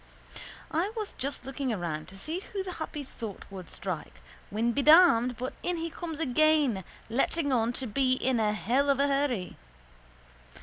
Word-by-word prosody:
I 345 +7 0
was 425 -2 -3
just 275 +2 -4
looking 270 -1 -2
around 170 -7 -3
to 195 - -12
see 315 - -3
who 390 0 -5
the 375 - -5
happy 300 -2 -4
thought 225 -6 -8
would 185 -3 -8
strike 180 -3 -4 0.3
when 225 +3 +1
be 280 - 0
damned 275 -7 +6
but 255 +1 -4
in 355 -1 -1
he 330 0 -3
comes 325 -2 -5
again 295 -7 +3 0.2
letting 280 +5 0
on 235 -2 +2
to 260 - -4
be 255 +3 +2
in 255 -1 +1
a 215 -1 +2
hell 250 +7 +1
of 275 -1 +3
a 280 - +4
hurry. 275 -9 0
260 Hz, 175 wpm, -29 LUFS, 225-310 Hz, 0.3 s, damned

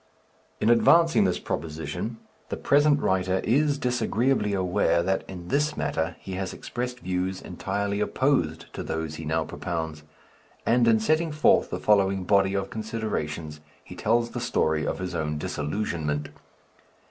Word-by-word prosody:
In 110 - +3
advancing 165 +2 +5
this 90 - +1
proposition, 80 +8 -4 0.3
the - - -3
present 145 +1 +4
writer 95 0 +1
is 145 +4 +2
disagreeably 125 -2 +1
aware 90 -2 +2
that 95 +2 0
in 90 -2 -8
this 150 +3 +1
matter 80 +1 -1
he 95 - -9
has 95 0 -3
expressed 125 0 -5
views 95 +1 -2
entirely 100 +3 -3
opposed 105 - +1
to - - -5
those 80 -1 -4
he 80 - -7
now 80 +1 0
propounds; 80 -3 -4 0.6
and 120 0 +3
in 110 -1 +5
setting 155 +8 +1
forth 150 0 +3
the - - -3
following 100 -2 +3
body 95 +1 +3
of 95 -1 -2
considerations 100 -9 -4 0.2
he - - -11
tells 115 +2 +1
the - - -4
story 80 -1 +1
of - - -1
his 90 -1 -4
own 75 -2 -2
disillusionment. 75 -1 -2
95 Hz, 145 wpm, -26 LUFS, 80-115 Hz, 0.6 s, advancing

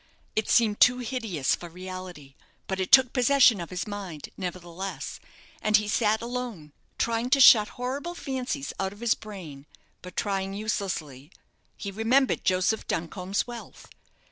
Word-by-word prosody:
It 215 - 0
seemed 220 -3 +3
too 250 0 +6
hideous 225 - -1
for 175 - -5
reality; 180 -5 -9 0.3
but 190 0 -3
it 185 - -2
took 260 -2 +7
possession 250 -5 +5
of 170 - -6
his 180 0 -4
mind, 195 -8 -7
nevertheless, 180 0 -6 0.4
and 215 0 +4
he 210 0 -2
sat 215 +1 +1
alone, 235 -11 -5 0.3
trying 230 +1 0
to 275 +1 +4
shut 220 -5 +8
horrible 275 +8 -4
fancies 255 - -4
out 190 0 -2
of 205 - -16
his 235 -2 +3
brain, 165 -10 -10 0.3
but 180 0 -11
trying 195 -1 -1
uselessly. 170 -10 -3 0.5
He 200 - -5
remembered 235 +6 +2
Joseph 185 +4 +1
Duncombe's 180 +4 -2
wealth. 240 -1 -10
205 Hz, 145 wpm, -27 LUFS, 180-235 Hz, 0.5 s, shut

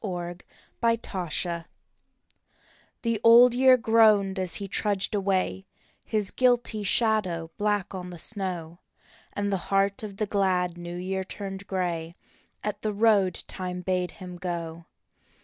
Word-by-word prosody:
BLOOD 175 -3 -5 0.4
ROAD 180 -7 -1 1.4
THE 230 -3 -1
Old 235 +1 +8
Year 255 +1 +6
groaned 215 -4 +4
as 185 -2 0
he 200 - -3
trudged 200 0 -1
away, 195 -1 -1 0.4
His 210 -3 0
guilty 245 -4 +1
shadow 195 -6 +2
black 205 -1 0
on 180 -1 -6
the 175 - -9
snow, 175 -3 -4 0.5
And 205 0 -1
the - - +2
heart 195 0 +1
of 205 -3 -7
the 215 - 0
glad 185 -4 0
New 175 0 -7
Year 190 +1 -3
turned 195 0 -7
grey 170 -3 -3 0.5
At 205 -1 -4
the 215 -1 -2
road 205 -4 +2
Time 180 -1 -5
bade 180 -1 0
him 180 -1 -9
go. 170 -2 -5
195 Hz, 130 wpm, -26 LUFS, 180-210 Hz, 1.4 s, Old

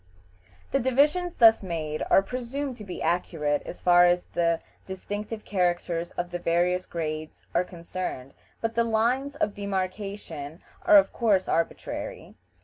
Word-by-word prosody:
The 275 - +2
divisions 295 +8 +2
thus 225 -2 +7
made 160 -5 -4
are 195 - +6
presumed 255 +4 -4
to 215 - -9
be 185 -3 -6
accurate 160 -3 0
as - - -8
far 175 0 +6
as 175 0 +3
the 170 -1 +2 0.3
distinctive 205 +3 -5
characters 175 -3 0
of 175 0 -4
the 175 - -3
various 175 +2 +1
grades 155 -2 -5
are - - +3
concerned, 170 -6 -6 0.3
but 225 0 -1
the 235 0 +2
lines 240 +5 +1
of 210 -8 0
demarkation 190 -5 -4 0.2
are 315 -3 +8
of 290 - +4
course 205 -6 +2
arbitrary. 165 - -3
185 Hz, 140 wpm, -27 LUFS, 170-225 Hz, 0.3 s, are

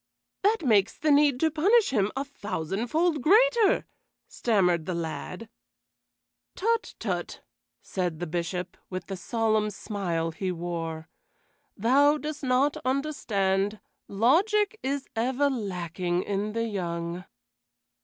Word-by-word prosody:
"That 420 -4 +2
makes 215 -4 +3
the 305 +1 +1
need 285 -3 +4
to 320 -1 +3
punish 395 - +3
him 210 -5 +1
a 275 +1 -2
thousandfold 245 - -1
greater," 445 - +4 0.4
stammered 180 -8 +1
the 180 - -1
lad. 170 +5 -5 1.1
"Tut, 460 +3 0
tut!" - - -4 0.4
said 175 -4 -3
the 175 - -2
Bishop, 175 +2 -3
with 185 0 -5
the 195 - -5
solemn 215 +3 0
smile 180 -5 -3
he 185 +3 -3
wore. 165 -2 -4 0.7
"Thou 280 +7 +4
dost 300 0 -5
not 265 +2 +2
understand: 210 -8 0 0.3
logic 400 - +2
is 275 +1 -2
ever 260 +5 +1
lacking 180 -5 -2
in 205 +1 -2
the 230 0 -1
young." 175 -4 -4
215 Hz, 115 wpm, -27 LUFS, 180-285 Hz, 1.1 s, need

